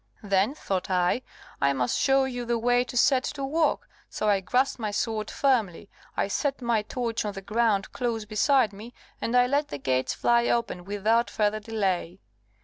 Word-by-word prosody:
Then, 200 +6 +1
thought 190 -11 -3
I, 180 +5 +1 0.4
I 140 0 +3
must 125 -2 0
show 270 -1 +3
you 245 -2 -3
the 235 0 0
way 245 +1 +2
to 250 - -6
set 260 +1 +4
to 275 -1 -3
work; 325 - 0 0.2
so 215 - -3
I 200 -2 +4
grasped 250 +8 0
my 215 -2 -2
sword 215 +1 -2
firmly, 225 -10 0 0.3
I - - +1
set 275 +7 -1
my 235 -3 +1
torch 230 +1 -3
on 210 -1 -3
the 195 - -7
ground 210 -2 +1
close 230 -3 -2
beside 220 +2 +2
me, 220 +5 -11 0.3
and 240 +2 +1
I 245 - +6
let 285 +3 0
the - - -6
gates 130 -1 -1
fly 235 0 +2
open 225 -7 -1
without 215 +4 +1
further 215 0 0
delay. 195 -5 -2
225 Hz, 185 wpm, -26 LUFS, 200-245 Hz, 0.4 s, I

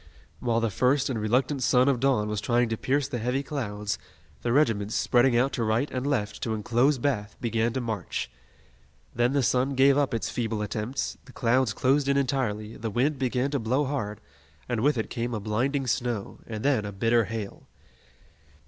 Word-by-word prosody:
While 115 -2 +1
the 115 -2 0
first 130 +5 +2
and 115 -4 -2
reluctant 130 +6 +1
sun 125 +1 +4
of 135 -4 +2
dawn 125 -5 +2
was 105 -1 -2
trying 120 +1 +2
to 110 - 0
pierce 135 +4 0
the 120 - -4
heavy 125 +4 -1
clouds, 105 -8 -3 0.4
the 120 - -1
regiments, 115 -7 +2
spreading 120 0 +3
out 130 +3 +2
to 120 - -1
right 115 +6 0
and 130 +1 -2
left 110 -7 -1
to 110 -2 -1
enclose 120 +7 +2
Bath, 115 -6 -1
began 115 0 0
to 130 - -1
march. 110 - -3 0.8
Then 120 +2 +1
the 140 -2 +2
sun 130 +4 +1
gave 135 +2 +5
up 135 -4 +1
its 115 - -2
feeble 110 -3 -2
attempts, 110 +6 -3
the 130 - -14
clouds 125 0 +2
closed 135 +5 +2
in 140 0 +3
entirely, 120 -6 -1
the 115 - -3
wind 130 +6 0
began 130 +1 0
to 140 - 0
blow 125 +6 +1
hard, 110 -7 -3 0.5
and 120 -3 -1
with 145 +1 +3
it 110 - -3
came 120 0 -2
a - - -2
blinding 125 +7 -1
snow, 120 -3 -2
and 110 0 -5
then 135 -7 +3
a 105 - -5
bitter 115 +3 +2
hail. 110 -1 -6
120 Hz, 195 wpm, -27 LUFS, 110-135 Hz, 0.8 s, gave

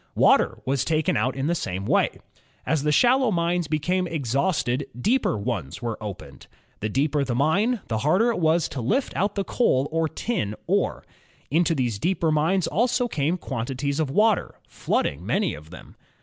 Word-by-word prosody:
Water - - +4
was 135 0 0
taken 155 0 +1
out 130 +1 0
in 135 0 -2
the 170 - +1
same 95 - -3
way. - - +1 0.5
As 160 -2 +1
the 150 +1 +1
shallow 255 - +4
mines 170 -2 0
be 155 0 0
came 180 +4 0
exhausted, 140 -2 -1
deeper 235 - +1
ones 100 - -4
were 115 -1 -4
opened. 90 -10 -8 0.3
The 110 - -2
deeper 140 +4 +1
the 125 -3 -2
mine, 195 - +2
the 110 -1 -1
harder 185 - +3
it 230 - -3
was 160 0 +2
to 130 - -5
lift 250 - 0
out 200 +3 0
the 200 - 0
coal 145 - +1
or 165 0 0
tin 155 - -2
ore. - - 0 0.5
Into 165 +2 +2
these 120 -7 -1
deeper 170 - +1
mines 160 +5 +2
also 245 +3 +1
came 160 -3 -1
quantities 135 0 -3
of 155 -3 0
water, 215 +8 +2
flooding 70 +5 -1
many 175 - 0
of 75 +1 -11
them. 90 - -13
155 Hz, 175 wpm, -24 LUFS, 125-185 Hz, 0.5 s, Water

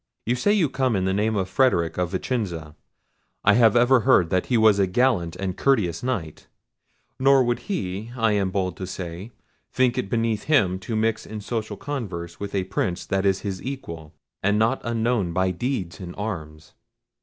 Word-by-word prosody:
You 120 - +1
say 125 +12 +1
you 200 -7 +3
come 130 -3 0
in 95 -1 0
the 95 - +1
name 105 +2 +1
of 95 -2 0
Frederic 90 - +1
of 90 -1 0
Vicenza; 90 -6 -3 0.7
I 105 - +5
have 115 -1 +5
ever 120 +2 +5
heard 90 -5 +3
that 90 -1 +1
he 125 - +2
was 110 -2 +5
a 95 - +3
gallant 90 -5 +1
and 95 -2 -3
courteous 105 -12 +1
Knight; 100 -12 -4 0.7
nor 135 0 +5
would 120 0 0
he, 105 - -3
I 115 -2 +2
am 100 -2 +1
bold 95 -2 -2
to 95 - -5
say, 90 +4 -7 0.4
think 130 -1 +2
it 100 - -3
beneath 115 -2 0
him 100 -12 +2
to 110 +5 -4
mix 110 0 0
in 110 - -6
social 110 -1 -4
converse 95 - -5
with 100 0 -5
a 95 - +1
Prince 95 -1 -2
that 95 0 0
is 95 -1 +1
his 95 -2 -4
equal, 85 - -7 0.3
and 105 +2 +2
not 115 +5 +2
unknown 115 -6 0
by 95 +1 +1
deeds 90 - -3
in 90 -1 -8
arms. 80 -7 -6
100 Hz, 190 wpm, -24 LUFS, 90-120 Hz, 0.7 s, I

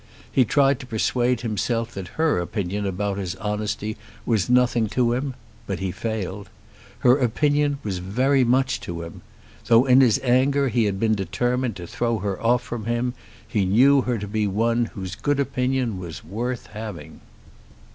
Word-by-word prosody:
He 130 - +4
tried 140 +2 +3
to 130 - -9
persuade 120 +1 0
himself 115 +1 -1
that 95 -2 -6
her 160 - +2
opinion 100 +2 -2
about 100 +1 -2
his 95 -2 -3
honesty 105 +1 -3 0.3
was 110 -5 +1
nothing 125 -2 +3
to 120 +2 +1
him; 130 +1 -2 0.3
but 95 - -2
he 95 0 -3
failed. 105 -2 -4 0.5
Her 125 +2 +5
opinion 145 +3 +1
was 95 -4 -3
very 130 +9 +2
much 130 -1 +2
to 85 -1 -5
him. 85 - -10 0.5
Though 115 +2 +6
in 130 0 +6
his 120 -5 +4
anger 135 +2 +3
he 115 -1 +2
had 100 -2 -1 0.2
determined 120 +5 -1
to 90 - -7
throw 115 +6 -1
her 100 -1 -3
off 120 +1 +2
from 115 -3 -6
him, 120 +1 -1 0.3
he 105 -4 0
knew 130 +9 +5
her 125 -1 -1
to 105 -1 -5
be 105 0 0
one 115 +4 +1
whose 95 -4 -7
good 145 +8 -1
opinion 130 -5 0
was 80 -6 -8
worth 120 +7 -4
having. 105 -8 -8
115 Hz, 165 wpm, -23 LUFS, 100-125 Hz, 0.5 s, Though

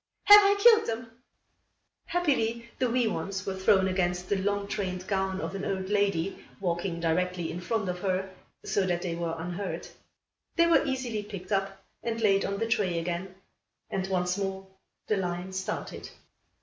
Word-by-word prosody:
"Have 415 0 +10
I 400 0 +4
killed 445 +1 +7
them?" 230 +1 -4 1.0
Happily 235 -9 0
the 255 -2 +2
wee 245 0 +2
ones 195 -2 -3
were 195 - -2
thrown 190 0 +4
against 180 -1 -1
the 200 - +2
long 200 0 0
trained 185 -3 -3
gown 190 -1 -1
of - - -4
an 195 0 -4
old 190 -1 -2
lady 200 -3 0 0.2
walking 175 -1 -2
directly 175 +1 0
in 175 - -5
front 215 +2 -1
of 180 0 -3
her, 190 0 -1 0.3
so 200 - +1
that 175 -1 -1
they 175 -2 -2
were 170 -1 -2
unhurt. 175 +4 -5 0.6
They 335 - +5
were 335 -1 +5
easily 255 -6 -2
picked 200 -3 -9
up 195 -1 -1 0.2
and 230 -1 -2
laid 200 -3 +3
on 200 - -2
the 225 - 0
tray 195 -6 +1
again, 175 +3 -3 0.6
and 190 0 -1
once 180 0 0
more 195 -1 -3 0.4
the 215 - +1
line 180 0 -3
started. 190 +3 -4
195 Hz, 170 wpm, -28 LUFS, 180-215 Hz, 1.0 s, Have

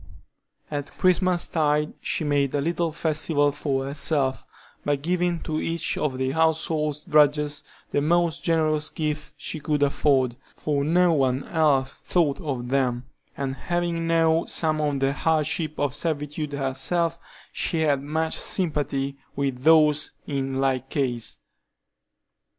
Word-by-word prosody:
At 145 -1 -5
Christmas 185 -1 +3
tide 150 -1 +1
she - - -1
made 145 -2 +1
a - - +2
little 170 +2 0
festival 150 -2 +1
for 140 -2 -2
herself, 140 -1 0 0.4
by 145 - +1
giving 175 +3 0
to 155 0 -2
each 165 0 -1
of 135 -4 -1
the 130 0 0
household 160 -1 +1
drudges 150 -1 +3 0.3
the 145 - +1
most 170 +1 +1
generous 155 -2 +1
gift 150 -1 -4
she 155 - -4
could 150 -1 0
afford, 135 -3 +2 0.2
for 145 -2 -1
no 175 +3 +3
one 135 -2 +1
else 145 -5 +1
thought 165 -3 +1
of 130 -6 -3
them, 125 -2 +1 0.3
and 135 -1 -2
having 170 +1 -2
known 165 0 +3
some 155 -2 0
of 145 -2 0
the 135 0 +2
hardships 155 0 0
of 145 -3 0
servitude 150 -1 -2
herself, 165 +5 -1 0.3
she 165 - -1
had 145 -3 +2
much 160 +3 -2
sympathy 140 -6 -1 0.2
with 135 -3 -1
those 150 0 +4
in 135 -2 -2
like 135 -1 0
case. 125 -5 -2
150 Hz, 135 wpm, -25 LUFS, 140-160 Hz, 0.4 s, those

